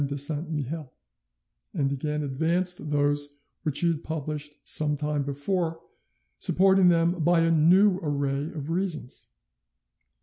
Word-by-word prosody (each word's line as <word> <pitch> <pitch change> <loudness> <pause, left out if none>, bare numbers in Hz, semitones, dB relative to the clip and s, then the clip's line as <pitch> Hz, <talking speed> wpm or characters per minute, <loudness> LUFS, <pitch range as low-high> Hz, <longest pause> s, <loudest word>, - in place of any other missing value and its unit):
de 140 0 -4
Saint 150 +3 -2
Mihiel, 150 -1 -4 0.8
and 140 -5 0
again 150 +2 -2
advanced 165 +4 -1
those 145 0 0 0.3
which 150 -2 0
he 175 - +2
had 160 -2 -1
published 150 -1 -4
some 150 -1 +1
time 150 0 -1
before, 160 +4 -2 0.6
supporting 190 0 +4
them 170 0 +2
by 170 +1 +4
a 165 0 +3
new 180 +5 +5
array 140 -2 -1
of 150 0 -6
reasons. 170 -8 -3
155 Hz, 130 wpm, -26 LUFS, 145-170 Hz, 0.8 s, new